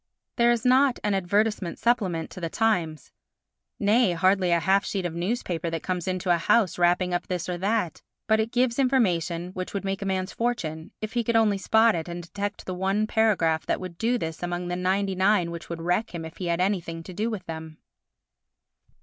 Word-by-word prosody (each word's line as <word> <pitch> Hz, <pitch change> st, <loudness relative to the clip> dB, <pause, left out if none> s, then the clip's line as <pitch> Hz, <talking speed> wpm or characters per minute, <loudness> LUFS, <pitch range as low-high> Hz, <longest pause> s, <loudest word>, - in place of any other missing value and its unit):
There 235 Hz, -1 st, +4 dB
is 240 Hz, -1 st, +1 dB
not 260 Hz, +1 st, +4 dB
an 210 Hz, -1 st, +1 dB
advertisement 195 Hz, 0 st, 0 dB
supplement 190 Hz, -9 st, 0 dB
to 185 Hz, -, -9 dB
the 165 Hz, -, -2 dB
Times—nay, 200 Hz, -, -1 dB
hardly 185 Hz, +2 st, +2 dB
a 170 Hz, 0 st, +3 dB
half 195 Hz, +5 st, +3 dB
sheet 195 Hz, -3 st, -3 dB
of 175 Hz, -, -2 dB
newspaper 175 Hz, -2 st, -2 dB
that 165 Hz, -1 st, -4 dB
comes 180 Hz, -1 st, -3 dB
into 185 Hz, -1 st, 0 dB
a 170 Hz, -, +1 dB
house 195 Hz, +1 st, +2 dB
wrapping 180 Hz, +1 st, +2 dB
up 175 Hz, -, -2 dB
this 180 Hz, -3 st, -3 dB
or 180 Hz, -, -2 dB
that, 200 Hz, -3 st, -1 dB, 0.2 s
but 220 Hz, 0 st, +3 dB
it 220 Hz, +1 st, -1 dB
gives 245 Hz, 0 st, +1 dB
information 180 Hz, -, +1 dB
which 185 Hz, +1 st, -6 dB
would 200 Hz, -, -3 dB
make 195 Hz, 0 st, -2 dB
a 195 Hz, -, -3 dB
man's 185 Hz, 0 st, -2 dB
fortune, 165 Hz, -10 st, -2 dB
if 215 Hz, 0 st, -5 dB
he 240 Hz, -1 st, +1 dB
could 235 Hz, +1 st, 0 dB
only 215 Hz, -3 st, +3 dB
spot 220 Hz, +3 st, +4 dB
it 165 Hz, -1 st, -3 dB
and 175 Hz, 0 st, -6 dB
detect 205 Hz, +4 st, -5 dB
the 185 Hz, -, -4 dB
one 195 Hz, +3 st, 0 dB
paragraph 195 Hz, -8 st, +1 dB
that -, -, 0 dB
would 180 Hz, -2 st, -8 dB
do 240 Hz, +2 st, +1 dB
this 160 Hz, -6 st, -5 dB
among 175 Hz, 0 st, -3 dB
the 175 Hz, -, -1 dB
99 190 Hz, 0 st, +1 dB
which 170 Hz, 0 st, -8 dB
would 165 Hz, -1 st, -5 dB
wreck 180 Hz, +3 st, 0 dB
him 165 Hz, -1 st, -5 dB
if 160 Hz, -, -10 dB
he 180 Hz, -, -4 dB
had 170 Hz, 0 st, 0 dB
anything 175 Hz, -3 st, -1 dB
to 185 Hz, -, -9 dB
do 215 Hz, +5 st, -1 dB
with 205 Hz, -5 st, -5 dB
them. 160 Hz, -1 st, -7 dB
185 Hz, 205 wpm, -26 LUFS, 170-215 Hz, 0.2 s, There